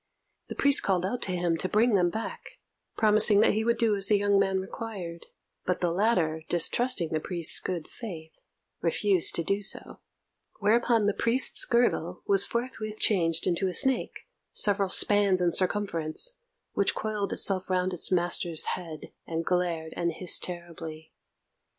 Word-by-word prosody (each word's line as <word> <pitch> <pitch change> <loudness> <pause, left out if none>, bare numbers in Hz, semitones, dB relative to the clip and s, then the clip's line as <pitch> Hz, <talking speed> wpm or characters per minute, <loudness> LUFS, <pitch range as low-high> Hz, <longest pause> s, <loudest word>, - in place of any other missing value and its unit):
The - - -7
priest 280 0 +4
called 185 -2 0
out 240 +6 -3
to 185 - -2
him 175 -2 -1
to 185 - -3
bring 225 +2 +2
them 180 -3 +2
back, 220 +5 -7 0.4
promising 215 -1 +4
that - - +3
he 220 +1 -1
would 235 +1 0
do 225 -3 +2
as 195 -1 -2
the 210 - +3
young 200 0 +2
man 190 -1 +1
required; 190 -4 -8 0.4
but 180 - -2
the 175 -2 0
latter, 175 -5 0
distrusting 175 +2 +2
the 160 - -2
priest's 170 0 +1
good 175 -4 -5
faith, 165 -9 -10 0.4
refused 185 +1 +2
to 170 - +1
do 195 +4 -1
so; 195 - -2 0.6
whereupon 225 +1 +2
the 205 - +1
priest's 235 +5 +2
girdle 210 -8 0
was 200 -1 +4
forthwith 225 -2 -5
changed 165 -7 +1
into 185 +2 0
a 185 - -3
snake, 265 -2 +1 0.3
several 200 -2 +2
spans 200 -1 +3
in 175 -1 +1
circumference, 185 - 0 0.4
which 200 - 0
coiled 210 -3 -3
itself 190 -1 +1
round 185 0 0
its 180 - -2
master's 175 -2 0
head, 165 -4 -9
and 165 0 -4
glared 170 -3 -2
and 170 -1 -2
hissed 180 +2 +1
terribly. 165 -3 -8
190 Hz, 160 wpm, -27 LUFS, 170-210 Hz, 0.6 s, priest